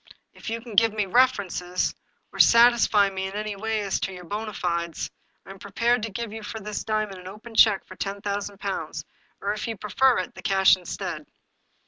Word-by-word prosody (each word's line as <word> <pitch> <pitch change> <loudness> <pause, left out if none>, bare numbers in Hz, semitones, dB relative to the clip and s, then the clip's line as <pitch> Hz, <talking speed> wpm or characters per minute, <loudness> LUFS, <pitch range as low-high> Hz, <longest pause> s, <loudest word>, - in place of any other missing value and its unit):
" - - -49
If - - -8
you 230 +1 -3
can 235 -1 -10
give 225 +1 +4
me 210 -2 0
references, 195 -6 +1 0.4
or - - -9
satisfy 230 -4 +6
me 190 0 -3
in 190 - -8
any 210 0 -3
way 220 +1 -2
as 200 -2 -1
to 195 - -2
your 180 -1 -9
bona 210 +4 -4
fides, 170 -3 -3 0.3
I 190 - -10
am 195 - -12
prepared 230 +4 +1
to 225 - -3
give 225 +1 -5
you 225 - -6
for 220 +1 -6
this 210 0 -5
diamond 215 -3 -2
an 180 - -11
open 215 +4 -10
check 215 -3 +5
for 185 - -12
ten 200 +1 -4
thousand 200 0 -4
pounds, 195 -1 -4 0.4
or 200 +1 -1
if 215 +3 -4
you 225 -2 -4
prefer 245 +6 +2
it, 185 - -3
the - - -11
cash 190 -1 +5
instead." 180 -2 -6
205 Hz, 210 wpm, -25 LUFS, 195-225 Hz, 0.4 s, satisfy